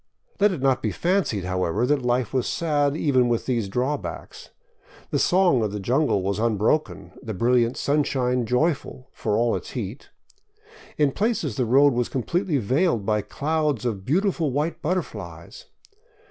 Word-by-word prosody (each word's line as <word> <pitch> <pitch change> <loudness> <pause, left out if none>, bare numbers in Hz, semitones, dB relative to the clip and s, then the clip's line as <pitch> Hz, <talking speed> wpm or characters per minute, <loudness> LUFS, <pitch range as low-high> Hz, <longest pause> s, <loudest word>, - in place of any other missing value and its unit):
Let 205 0 +4
it 155 -8 -4
not 135 -1 +2
be - - 0
fancied, 175 - 0
however, 90 +4 0
that 145 +1 +1
life 125 -1 0
was 130 -2 0
sad 145 -3 0
even 130 -6 +2
with 120 -1 0
these 115 -6 -1
drawbacks. 130 +7 -4 0.6
The - - +1
song 180 -8 +3
of 105 -2 -1
the 105 - -4
jungle 120 0 +1
was 100 +2 -1
unbroken, 115 +6 0
the 110 -5 -6
brilliant 120 +2 +2
sun 145 +1 +1
shine 125 -3 -1
joyful, 130 0 -1
for 105 -2 -1
all 120 0 +2
its - - -7
heat. 110 +2 -6 0.9
In 145 -2 +3
places 200 - -1
the 125 - 0
road 140 +3 +5
was 120 0 -1
completely 160 - -1
veiled 130 - +1
by 105 0 +1
clouds 150 -1 -1
of 105 -6 -2
beautiful 170 - +1
white 150 +5 -2
butterflies. 185 - -5
130 Hz, 160 wpm, -24 LUFS, 115-150 Hz, 0.9 s, road